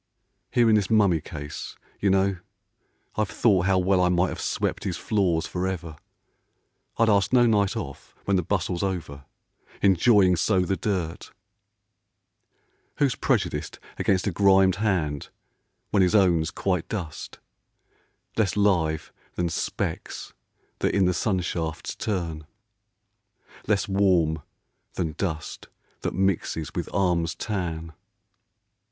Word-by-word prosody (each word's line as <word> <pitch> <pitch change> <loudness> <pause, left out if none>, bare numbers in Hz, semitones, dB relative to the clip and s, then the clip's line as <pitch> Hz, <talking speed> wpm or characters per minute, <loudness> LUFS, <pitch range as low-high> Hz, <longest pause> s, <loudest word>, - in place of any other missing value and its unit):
Here 120 -1 +3
in 110 - +5
this 105 -3 +2
mummy 100 -7 +3
case, 75 0 -7 0.2
you 100 - +2
know, 95 0 +2 0.8
I've 110 -2 +1
thought 95 -6 +2
How 95 -1 +3
well 95 0 +3
I 90 - +3
might 90 +1 +2
have - - -6
swept - - -2
his - - -2
floors 90 -6 +1
for 90 +1 -2
ever, 85 -4 -4 1.0
I'd 115 - +4
ask 100 -3 +3
no 125 -1 +5
night 105 -4 +2
off - - -7
when 100 - +2
the 90 - +3
bustle's 90 -1 -1
over, 80 -8 -4 0.5
Enjoying 95 0 +5
so 95 +2 +2
the 90 +2 0
dirt. 90 -5 -3 1.6
Who's 140 -4 +2
prejudiced - - -1 0.2
Against 95 -2 +1
a 100 - +1
grimed 95 0 +4
hand 85 -9 -1 0.6
when 100 - +3
his 90 +2 +3
own's 85 -5 +4
quite 90 0 -2
dust, 90 -8 -5 1.0
Less 105 -2 +1
live 85 -7 +1 0.2
than 85 -1 0
specks - - -4 0.5
that - - 0
in 100 -2 +4
the 90 - +2
sun 95 0 0
shafts 80 -3 -4
turn, 85 -7 -3 1.2
Less 100 -2 +1
warm 90 -6 +2 0.5
than 85 -4 -1
dust 80 -6 -4 0.3
that - - -3
mixes 90 -5 0
with - - -3
arms' 85 -3 +1
tan 85 -6 -4
95 Hz, 130 wpm, -25 LUFS, 85-100 Hz, 1.6 s, in